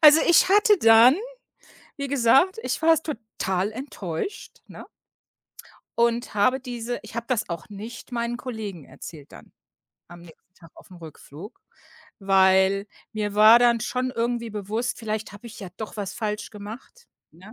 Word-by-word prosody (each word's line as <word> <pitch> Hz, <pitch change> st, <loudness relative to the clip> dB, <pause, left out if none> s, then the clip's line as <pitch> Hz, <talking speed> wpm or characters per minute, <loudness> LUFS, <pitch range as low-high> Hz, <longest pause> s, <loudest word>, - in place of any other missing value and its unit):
Also 310 Hz, 0 st, +8 dB
ich 345 Hz, +2 st, +5 dB
hatte 415 Hz, +1 st, +4 dB
dann, 225 Hz, +3 st, +7 dB, 0.8 s
wie 280 Hz, -1 st, -5 dB
gesagt 275 Hz, -, +3 dB
ich -, -, -3 dB
war 325 Hz, +1 st, +5 dB
s 320 Hz, -, -1 dB
total 215 Hz, -, -3 dB
enttäuscht, 225 Hz, -, -6 dB
ne? -, -, -11 dB, 1.1 s
Und 235 Hz, +1 st, +1 dB
habe 215 Hz, +6 st, +2 dB
diese 245 Hz, -2 st, -5 dB
ich -, -, -12 dB
habe 235 Hz, 0 st, -4 dB
das 250 Hz, -4 st, -1 dB
auch 170 Hz, -1 st, -6 dB
nicht 220 Hz, +5 st, -10 dB
meinen 235 Hz, 0 st, -3 dB
Kollegen 215 Hz, -, -7 dB
erzählt 150 Hz, -4 st, -12 dB
dann. -, -, -15 dB, 0.6 s
Am 175 Hz, 0 st, -13 dB
nächsten 175 Hz, +2 st, -19 dB
Tag 165 Hz, -3 st, -18 dB
aufm 185 Hz, -, -15 dB
Rückflug, 165 Hz, -, -12 dB, 0.6 s
weil 195 Hz, 0 st, +3 dB, 0.3 s
mir 210 Hz, -2 st, -3 dB
war 215 Hz, +3 st, +8 dB
dann 240 Hz, -1 st, +3 dB
schon 250 Hz, +3 st, -2 dB
irgendwie 235 Hz, -1 st, -2 dB
bewusst: 215 Hz, +4 st, -3 dB
„Vielleicht 215 Hz, -2 st, -4 dB
habe 205 Hz, +4 st, -12 dB
ich 225 Hz, -, -11 dB
ja 190 Hz, -, -7 dB
doch 220 Hz, -, -7 dB
was 200 Hz, -2 st, -5 dB
falsch 210 Hz, -2 st, -4 dB
gemacht", 225 Hz, -, -11 dB, 0.2 s
ne? 185 Hz, +7 st, -15 dB
225 Hz, 155 wpm, -24 LUFS, 200-245 Hz, 1.1 s, Also